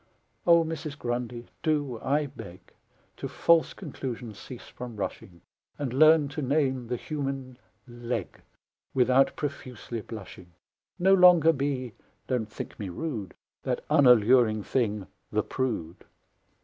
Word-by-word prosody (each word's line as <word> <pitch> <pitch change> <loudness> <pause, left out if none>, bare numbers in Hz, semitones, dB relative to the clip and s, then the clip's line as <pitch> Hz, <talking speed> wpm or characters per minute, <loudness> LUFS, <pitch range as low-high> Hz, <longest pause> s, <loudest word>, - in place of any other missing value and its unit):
O 170 -1 +7
Mrs. 160 -2 -5
Grundy, 120 -1 -3 0.2
do, 145 -7 0
I 145 +3 +1
beg, 95 -10 -11 0.4
To - - -4
false 170 -1 +3
conclusions 125 - -6
cease 125 -3 -10
from 125 -2 -8
rushing, 90 -4 -6 0.4
And 135 -4 -3
learn 155 +1 +6
to 145 +2 -5
name 130 -3 0
the 125 - -1
human 135 -2 -5 0.3
leg 120 0 -5 0.5
Without 130 +1 +4
profusely 130 -5 -5
blushing! 95 -5 -10 0.4
No 190 +1 +4
longer 175 -4 +7
be 135 -4 -2 0.3
(don't 120 -4 -1
think - - -8
me 100 -3 -4
rude) 110 - -5 0.3
That - - -3
unalluring 120 -5 +5
thing, 105 -6 -1 0.3
the - - +1
prude! 110 -11 -3
130 Hz, 125 wpm, -27 LUFS, 115-145 Hz, 0.5 s, O